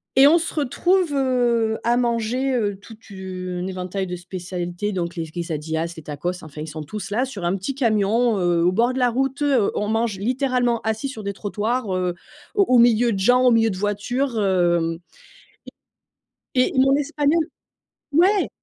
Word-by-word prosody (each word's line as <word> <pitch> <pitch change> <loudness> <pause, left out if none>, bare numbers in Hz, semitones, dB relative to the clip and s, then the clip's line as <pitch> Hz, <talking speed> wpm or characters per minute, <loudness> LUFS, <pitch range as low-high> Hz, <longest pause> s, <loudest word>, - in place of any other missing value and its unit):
et 270 +1 +8
on 315 - +7
se 335 - -4
retrouve, 330 +3 +1
heu, 240 -4 +1
à 240 +1 +3
manger, 240 +2 0
heu, 205 -4 0
tout 220 +2 -14
une 185 -2 -5
éventail 185 +1 -4
de 180 - -5
spécialités, 180 +2 -5
donc 175 -1 -3
les 165 -1 -3
quesadillas, 165 0 -3
les 160 - -9
tacos. 175 +5 -4
Enfin, 150 0 -10
ils 155 - -6
sont 155 0 -6
tous 200 +6 -7
là, 245 +5 +1
sur 210 -9 -7
un 185 +3 +1
petit 200 +8 -4
camion, 225 -2 +2
heu, 175 -2 +2
au 180 - +3
bord 235 +6 +2
de 260 - -3
la 250 - +3
route. 270 +4 -1 0.3
On 210 - -1
mange 225 -3 0
littéralement 250 +1 0
assis 220 +5 -2
sur 230 -5 -7
des 200 - -2
trottoirs, 215 +1 -2
heu, 180 -1 -1 0.4
au 405 - +4
au 250 - +7
milieu 235 0 +4
de 195 - -2
gens, 245 +6 +4
au 250 - +6
milieu 225 -1 +3
de 185 - -4
voitures, 225 +5 -1
hem. 175 -3 +1 1.6
Et 255 0 +4
et - - +1
mon 270 +1 +5
Espagnol 295 +2 +1 0.7
ouais! 375 +6 +3
215 Hz, 180 wpm, -22 LUFS, 180-250 Hz, 1.6 s, et